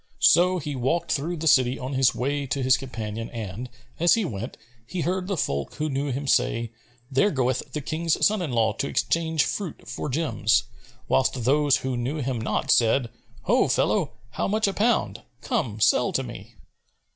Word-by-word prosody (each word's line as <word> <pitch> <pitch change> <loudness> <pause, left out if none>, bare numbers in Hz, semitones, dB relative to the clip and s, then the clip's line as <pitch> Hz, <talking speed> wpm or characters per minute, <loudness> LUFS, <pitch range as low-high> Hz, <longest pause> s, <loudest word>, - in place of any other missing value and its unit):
So 180 +1 +5
he 150 -3 -4
walked 155 +7 -1
through 165 +4 -1
the 160 - -5
city 130 -3 +4
on 130 +2 -5
his 130 -1 +3
way 140 +2 -1
to 135 +1 -2
his 130 0 +5
companion; 115 -4 -5
and, 115 +1 -6 0.3
as 170 +1 +5
he 225 -3 0
went, 100 - -5 0.3
he 180 +4 -3
heard 185 +2 -1
the 195 -2 -2
folk 70 - -2
who 155 0 -2
knew 140 +1 -1
him 135 +3 -3
say, 115 -4 +1 0.4
"There 135 +10 +3
goeth 130 -5 -1
the 150 - -3
King's 160 +3 0
son 210 -2 +2
in 160 -6 -3
law 110 -2 +2
to 140 - -3
exchange 160 +4 +1
fruit 195 - -4
for 120 +5 -4
gems;" 125 -6 +1 0.4
whilst 130 -2 +1
those 145 +2 +3
who 130 -1 -1
knew 125 +6 -2
him 130 -4 -2
not 115 - 0
said, 120 +1 +3 0.3
"Ho, 240 +7 +3
fellow, 185 -9 +1 0.2
how - - -2
much 215 +1 +1
a 195 - -1
pound? 200 - +1 0.2
Come, 110 -3 -2
sell 120 +3 +3
to 135 - 0
me." 115 -2 -10
135 Hz, 185 wpm, -25 LUFS, 120-165 Hz, 0.4 s, So